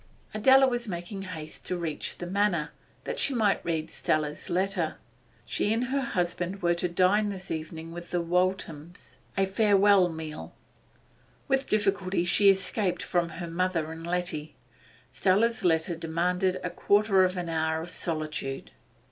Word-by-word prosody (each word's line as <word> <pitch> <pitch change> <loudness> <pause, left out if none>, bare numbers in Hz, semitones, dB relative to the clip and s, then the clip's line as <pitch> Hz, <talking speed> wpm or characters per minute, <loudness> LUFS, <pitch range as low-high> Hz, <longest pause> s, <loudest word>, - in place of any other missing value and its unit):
Adela 265 +5 +6
was 240 -2 -1
making 180 +1 -5
haste 165 -5 -8
to 180 - -2
Teach 155 -2 -4
the 175 - -6
Manor, 180 -4 0 0.3
that - - -4
she 275 - +1
might 210 -4 +2
read 160 -1 -2
Stella's 150 -1 -1
letter 185 -2 0 0.5
She 205 - 0
and 225 +2 +1
her 275 +2 -1
husband 180 -3 -2
were 175 0 +3
to 175 +1 -1
dine 190 +4 +3
this 190 -1 -7
evening 160 +1 -5
with 175 +1 -8
the 175 - 0
Walthams 175 -2 -2 0.2
a 195 - +3
farewell 200 -2 +4
meal. 160 -2 -7 0.9
With 270 0 +1
difficulty 195 -4 +1
she 200 +3 +6
escaped 190 -1 +1
from 175 -2 0
her 170 +1 -6
mother 170 -2 -1
and 165 +1 -8
Letty; 170 -4 -2 0.6
Stella's 225 +5 +2
letter 165 0 +2
demanded 180 +3 0
a - - -2
quarter 205 -2 +3
of 185 0 0
an 175 -1 -3
hour 160 -1 0
of 170 +2 -7
solitude. 155 -5 -3
180 Hz, 150 wpm, -28 LUFS, 165-195 Hz, 0.9 s, Adela